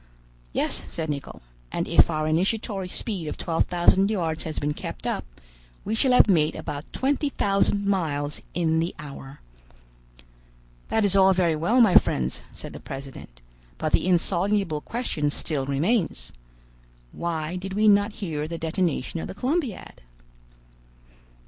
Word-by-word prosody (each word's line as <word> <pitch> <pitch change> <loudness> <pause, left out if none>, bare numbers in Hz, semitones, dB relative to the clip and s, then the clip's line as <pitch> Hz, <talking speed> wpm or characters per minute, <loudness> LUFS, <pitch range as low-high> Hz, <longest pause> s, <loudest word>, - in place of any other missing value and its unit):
"Yes," - - -2
said 160 -2 -3
Nicholl; 140 - -7 0.3
"and - - -2
if - - +5
our 155 -1 -1
initiatory 190 +4 0
speed 180 -3 -3
of - - -4
twelve 165 -2 0
thousand 185 +3 +3
yards 165 -7 -2
has 155 -1 -5
been 150 0 -1
kept - - -7
up, - - -1 0.6
we 215 - -1
shall 250 +3 +3
have 250 - +7
made 160 -5 +3
about 145 +2 -6
twenty 285 +2 0
thousand 200 -3 +1
miles 150 -7 -1
in 160 -2 +2
the 165 +2 -2
hour." 140 -1 -10 1.5
"That 220 -2 +2
is 200 -1 +3
all 190 0 +6
very 175 -3 +2
well, 210 +11 +3
my 215 -6 +5
friends," 65 - +3
said - - -8
the - - -8
president, 135 - -9 0.4
"but 155 - -2
the - - +3
insoluble 185 -2 +1
question 165 -11 -2
still 145 -2 -3
remains. 155 - 0 0.8
Why 165 0 -3
did 190 +1 -5
we 215 +1 +3
not 205 +1 +5
hear 155 -7 -3
the 165 +1 -5
detonation 165 -2 -1
of - - -5
the - - -8
Columbiad?" 260 - -2
170 Hz, 150 wpm, -25 LUFS, 150-200 Hz, 1.5 s, have